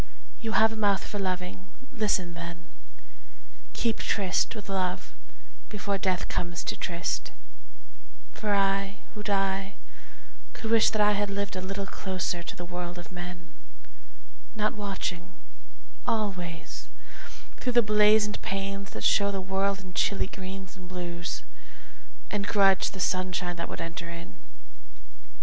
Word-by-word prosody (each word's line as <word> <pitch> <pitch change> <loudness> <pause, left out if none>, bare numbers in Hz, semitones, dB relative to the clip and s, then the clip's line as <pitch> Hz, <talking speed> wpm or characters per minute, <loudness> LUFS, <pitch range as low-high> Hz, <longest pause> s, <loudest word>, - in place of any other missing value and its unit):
You 225 -2 -1
have 220 0 +6
a - - -4
mouth 205 -3 +3
for 205 - -3
loving 185 0 -2 0.3
listen 200 -7 +2
then: 170 +1 -6 1.1
Keep 230 -2 +1
tryst 195 -4 +1
with 210 - -7
Love 185 -2 -1 0.6
before 200 -2 -1
Death 185 -2 +1
comes 170 -1 -1
to - - -1
tryst; 175 -1 -1 1.0
For 210 -2 +1
I, 195 0 +2 0.2
who 210 - -6
die, 195 -1 +1 0.8
could 225 - -4
wish 230 -1 +7
that 215 -1 +3
I 210 - +6
had 205 0 +1
lived 200 0 -2
A 185 - -2
little 195 +1 -2
closer 185 -3 -2
to - - -5
the 175 - -6
world 175 0 -4
of 175 0 -8
men, 175 -1 -7 1.0
Not 215 0 +2
watching 185 -3 -3 0.7
always 180 -7 -2 0.7
thro' 250 - 0
the 240 -1 +6
blazoned 210 0 +5
panes 195 0 -2
That - - -6
show 200 -1 +5
the 195 -1 -1
world 195 +1 +1
in 185 -1 -10
chilly 200 +2 +2
greens 190 +1 -7
and 180 -2 -10
blues 175 -1 -4 0.9
And 205 -1 0
grudge 195 -2 +5
the 190 - -8
sunshine 180 -1 +1
that 170 - -3
would - - -5
enter 170 0 -4
in. 170 - -7
195 Hz, 140 wpm, -29 LUFS, 180-205 Hz, 1.1 s, wish